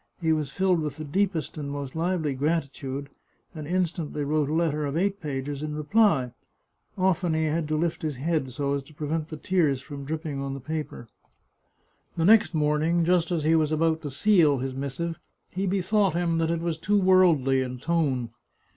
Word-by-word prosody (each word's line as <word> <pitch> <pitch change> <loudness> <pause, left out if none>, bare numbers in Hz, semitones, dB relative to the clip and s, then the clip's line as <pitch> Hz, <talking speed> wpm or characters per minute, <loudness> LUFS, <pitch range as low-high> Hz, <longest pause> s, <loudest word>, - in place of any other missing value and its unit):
He 160 -2 +2
was 150 -3 -1
filled 185 +3 +1
with 150 -2 -4
the 155 - -5
deepest 170 0 -1
and 140 -1 -4
most 140 -1 -5
lively 165 -3 0
gratitude, 140 -1 -2 0.4
and 155 -3 -7
instantly 170 -4 -1
wrote 150 0 0
a - - -1
letter 155 -3 +1
of 145 +1 -2
eight 200 +3 0
pages 140 -1 -4
in 150 0 -4
reply. 150 - +2 0.7
Often 185 -3 +1
he 160 - +1
had 155 0 0
to 155 - -1
lift 165 +1 -1
his 155 -3 -2
head, 150 0 -1
so 140 +2 -1
as 140 - -1
to 150 +3 -18
prevent 155 +1 -2
the 155 - -6
tears 155 -5 +1
from 140 +1 -8
dropping 155 -2 -4
on 135 0 -3
his 135 - -9
paper. 155 -5 -5 1.1
The 165 - +2
next 205 -5 +5
morning, 155 +3 +2
just 175 -1 +2
as 165 -3 0
he 160 +2 +3
was 155 -1 +2
about 160 0 +1
to 145 - -5
seal 155 0 +4
his 130 +1 -3
missive, 140 +5 -4 0.3
he 195 +2 -2
bethought 195 -1 +1
him 170 -1 +1
that 165 0 +1
it 165 0 -1
was 165 -2 -2
too 205 +5 +2
worldly 175 -9 +4
in 125 -1 -4
tone. 135 -5 0
155 Hz, 190 wpm, -26 LUFS, 140-170 Hz, 1.1 s, next